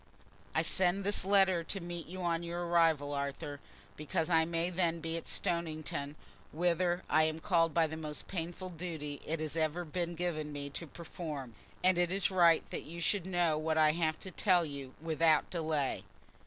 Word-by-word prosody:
_"I -, -, +3 dB
send 185 Hz, +1 st, +1 dB
this 205 Hz, -1 st, +1 dB
letter 190 Hz, -3 st, +4 dB
to 195 Hz, -, -2 dB
meet 175 Hz, -1 st, -6 dB
you 185 Hz, +2 st, -6 dB
on 170 Hz, -1 st, +1 dB
your 175 Hz, +1 st, -3 dB
arrival, 165 Hz, -4 st, +3 dB
Arthur, 140 Hz, 0 st, -4 dB, 0.4 s
because 155 Hz, +3 st, -2 dB
I 160 Hz, -1 st, +5 dB
may 170 Hz, +1 st, -1 dB
then 170 Hz, -2 st, +1 dB
be 165 Hz, 0 st, -3 dB
at 165 Hz, -, -4 dB
Stoniton, 155 Hz, -5 st, -2 dB, 0.4 s
whither 175 Hz, +2 st, +1 dB
I 155 Hz, +1 st, +4 dB
am 160 Hz, 0 st, -1 dB
called 165 Hz, -1 st, +2 dB
by 165 Hz, -1 st, +5 dB
the 160 Hz, 0 st, -5 dB
most 150 Hz, -1 st, -5 dB
painful 175 Hz, +1 st, -4 dB
duty 160 Hz, -4 st, -5 dB
it 160 Hz, +1 st, -1 dB
has 155 Hz, -1 st, -3 dB
ever 160 Hz, +2 st, 0 dB
been 170 Hz, +2 st, -3 dB
given 160 Hz, -3 st, -2 dB
me 140 Hz, -1 st, -5 dB
to 165 Hz, +4 st, -5 dB
perform, 150 Hz, -, -7 dB, 0.3 s
and 185 Hz, -1 st, +4 dB
it 175 Hz, 0 st, +2 dB
is 195 Hz, +1 st, +1 dB
right 170 Hz, -3 st, +5 dB
that -, -, -3 dB
you 170 Hz, +2 st, -8 dB
should 185 Hz, +1 st, +1 dB
know 175 Hz, -4 st, +2 dB
what 160 Hz, 0 st, 0 dB
I 155 Hz, -1 st, +6 dB
have 155 Hz, -1 st, 0 dB
to 190 Hz, -, -7 dB
tell 180 Hz, -3 st, +3 dB
you 140 Hz, -3 st, -7 dB
without 160 Hz, -1 st, +2 dB
delay. 155 Hz, -5 st, -1 dB
165 Hz, 185 wpm, -33 LUFS, 155-175 Hz, 0.4 s, I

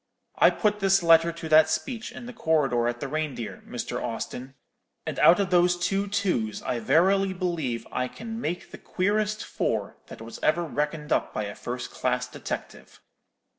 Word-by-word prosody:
I -, -, +8 dB
put 210 Hz, -1 st, 0 dB
this 195 Hz, -2 st, +3 dB
letter 165 Hz, 0 st, +6 dB
to 165 Hz, -1 st, -7 dB
that 155 Hz, 0 st, +6 dB
speech 240 Hz, -, -3 dB
in 240 Hz, -, -9 dB
the 245 Hz, -, -8 dB
corridor 135 Hz, -, +1 dB
at 120 Hz, 0 st, -3 dB
the 140 Hz, -, -2 dB
Reindeer, 145 Hz, -6 st, -4 dB
Mr. -, -, -4 dB
Austin; 130 Hz, +2 st, -5 dB, 0.5 s
and -, -, -4 dB
out 175 Hz, +4 st, +7 dB
of 195 Hz, -2 st, 0 dB
those 175 Hz, 0 st, +4 dB
two 195 Hz, +3 st, 0 dB
twos 185 Hz, -, -1 dB
I 120 Hz, -, -1 dB
verily 190 Hz, -, +3 dB
believe 165 Hz, -, -2 dB
I 125 Hz, 0 st, -1 dB
can 225 Hz, -, -7 dB
make 175 Hz, -3 st, -4 dB
the -, -, -10 dB
queerest 210 Hz, +3 st, -1 dB
four -, -, -2 dB
that -, -, -10 dB
was 115 Hz, +1 st, -9 dB
ever 170 Hz, +3 st, +2 dB
reckoned 150 Hz, 0 st, -3 dB
up -, -, -1 dB
by 105 Hz, -, -1 dB
a 100 Hz, 0 st, -5 dB
first 125 Hz, +3 st, -6 dB
class -, -, -1 dB
detective.' -, -, -7 dB
165 Hz, 175 wpm, -26 LUFS, 135-195 Hz, 0.5 s, I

